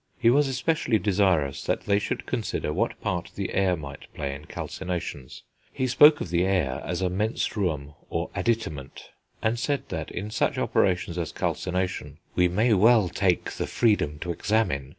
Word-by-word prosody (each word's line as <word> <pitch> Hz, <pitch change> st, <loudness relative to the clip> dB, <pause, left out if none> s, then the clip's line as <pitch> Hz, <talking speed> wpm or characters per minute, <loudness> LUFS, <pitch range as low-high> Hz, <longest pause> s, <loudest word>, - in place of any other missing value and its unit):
He 115 Hz, -2 st, +4 dB
was 145 Hz, +2 st, +4 dB
especially 130 Hz, -2 st, +1 dB
desirous 95 Hz, -9 st, +1 dB
they 100 Hz, 0 st, +1 dB
should -, -, -3 dB
consider 75 Hz, -, -2 dB
what 110 Hz, +8 st, -1 dB
part 85 Hz, -1 st, -2 dB
the 100 Hz, -2 st, -3 dB
air 95 Hz, -2 st, +2 dB
might 70 Hz, -2 st, -9 dB
play 70 Hz, -1 st, -3 dB
in 70 Hz, +2 st, -9 dB
calcinations; 85 Hz, -10 st, -5 dB, 0.3 s
he 130 Hz, -, -1 dB
spoke 145 Hz, +4 st, +7 dB
of 85 Hz, -, -5 dB
the 85 Hz, 0 st, +2 dB
air 90 Hz, -9 st, 0 dB
as 90 Hz, +3 st, -2 dB
a 90 Hz, -, +2 dB
"menstruum 90 Hz, -, -1 dB, 0.2 s
or -, -, -2 dB
additament," 90 Hz, -, -3 dB, 0.3 s
and 110 Hz, +2 st, +1 dB
said 140 Hz, +1 st, -1 dB
that, -, -, -4 dB
in 105 Hz, +4 st, -5 dB
such 110 Hz, -, 0 dB
operations 90 Hz, -2 st, +1 dB
as 80 Hz, -3 st, -3 dB
calcination, 90 Hz, -6 st, -2 dB, 0.2 s
"We 90 Hz, -, +4 dB
may 110 Hz, +7 st, +2 dB
well 105 Hz, -1 st, +5 dB
take 90 Hz, -1 st, +1 dB
the -, -, -3 dB
freedom 105 Hz, -10 st, +1 dB
to 85 Hz, -, -2 dB
examine 85 Hz, -7 st, 0 dB
95 Hz, 165 wpm, -26 LUFS, 80-110 Hz, 0.3 s, spoke